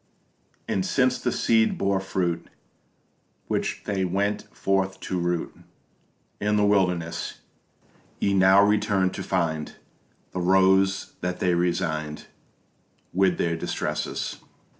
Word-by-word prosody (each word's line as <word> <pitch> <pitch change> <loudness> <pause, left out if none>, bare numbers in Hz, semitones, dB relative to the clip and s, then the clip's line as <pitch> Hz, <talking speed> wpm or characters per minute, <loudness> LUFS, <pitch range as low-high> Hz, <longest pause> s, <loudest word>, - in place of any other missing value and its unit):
And 95 - 0
since 130 +5 +2
the 125 - -1
seed 110 -1 +2
bore 100 0 +1
fruit, 90 -3 -2 1.0
Which - - -2
they 95 -2 -1
went 100 +3 -1
forth 95 0 0
to 90 - -2
root 85 -1 -2 0.8
In 105 +1 +1
the 105 0 +3
wildernesses, 90 -5 0 0.8
Ye 100 - +1
now 95 +1 +6
return 100 -2 +2
to - - -6
find 80 -5 -1 0.6
The 90 - -3
Rose 95 +1 +3
that 90 0 -3
they 90 -1 +2
resigned 85 -3 -1 0.9
With 95 -1 +2
their 85 -1 0
distresses. 80 - -3
95 Hz, 115 wpm, -25 LUFS, 90-100 Hz, 1.0 s, now